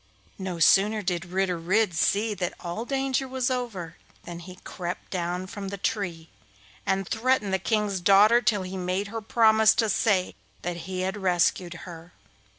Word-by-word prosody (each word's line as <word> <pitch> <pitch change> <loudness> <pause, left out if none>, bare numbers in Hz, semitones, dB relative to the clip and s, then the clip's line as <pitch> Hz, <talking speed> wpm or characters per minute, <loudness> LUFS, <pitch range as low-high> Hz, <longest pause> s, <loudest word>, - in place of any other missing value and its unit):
No 185 -2 -4
sooner 205 +6 +4
did 180 -1 -2
Ritter 180 -1 -1
Red 190 +4 +1
see 205 +6 +1
that 180 -3 -3
all 175 +7 -5
danger 270 0 -1
was 260 -1 -1
over 210 -10 -4 0.3
than 170 0 -8
he 180 +1 -10
crept 175 -1 -6
down 180 0 -2
from 200 0 -7
the 200 +1 -5
tree, 180 -5 -3 0.6
and 195 -1 0
threatened 225 -4 +1
the 190 - +2
King's 210 -1 0
daughter 205 +6 +6
till 210 -5 +1
he 185 +1 -6
made 185 +2 -2
her 225 +1 -5
promise 220 0 +4
to 225 -2 +1
say 190 -2 +1 0.3
that 175 0 -2
he 185 -1 -3
had 190 +2 -2
rescued 180 -2 +1
her. 170 -1 -11
195 Hz, 165 wpm, -26 LUFS, 180-220 Hz, 0.6 s, daughter